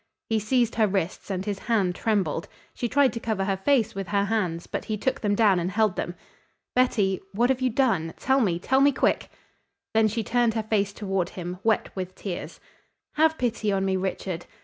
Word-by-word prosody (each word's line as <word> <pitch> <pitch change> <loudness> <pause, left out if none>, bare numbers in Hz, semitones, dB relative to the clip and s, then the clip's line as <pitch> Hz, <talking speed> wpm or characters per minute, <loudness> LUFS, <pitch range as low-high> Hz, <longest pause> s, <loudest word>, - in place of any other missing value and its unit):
He 225 -1 +2
seized 235 +2 +1
her 220 -1 +3
wrists 190 -1 -2
and 190 -1 -2
his 205 -2 -3
hand 200 -6 +1
trembled. 185 -6 -1 0.3
She 240 - -3
tried 275 +1 +3
to 230 - -4
cover 215 -4 -1
her 195 0 +1
face 230 +1 +2
with 195 -3 -5
her 200 +1 +1
hands, 185 -6 -1
but - - -4
he 215 - -2
took 260 +5 -1
them 205 -2 +1
down 200 -4 +4
and 175 +1 -1
held 210 -1 +1
them. 175 - -3 0.6
"Betty, 210 -7 +2
what 240 +5 +3
have 260 0 -1
you 255 - +2
done? 220 - +1
Tell 265 +1 +2
me 180 -7 +1
tell 265 +9 +2
me 285 +1 +6
quick." - - 0 0.6
Then 220 0 +4
she 220 +2 -2
turned 235 +1 +1
her 220 - 0
face 205 -2 0
toward 195 -3 -2
him, 180 0 -6
wet 225 -1 +1
with 185 -1 -5
tears. 185 -4 -6 0.5
"Have 315 +1 +3
pity 230 -4 0
on 195 -1 +1
me, 190 0 +1
Richard. 185 -2 -3
210 Hz, 205 wpm, -26 LUFS, 190-230 Hz, 0.6 s, me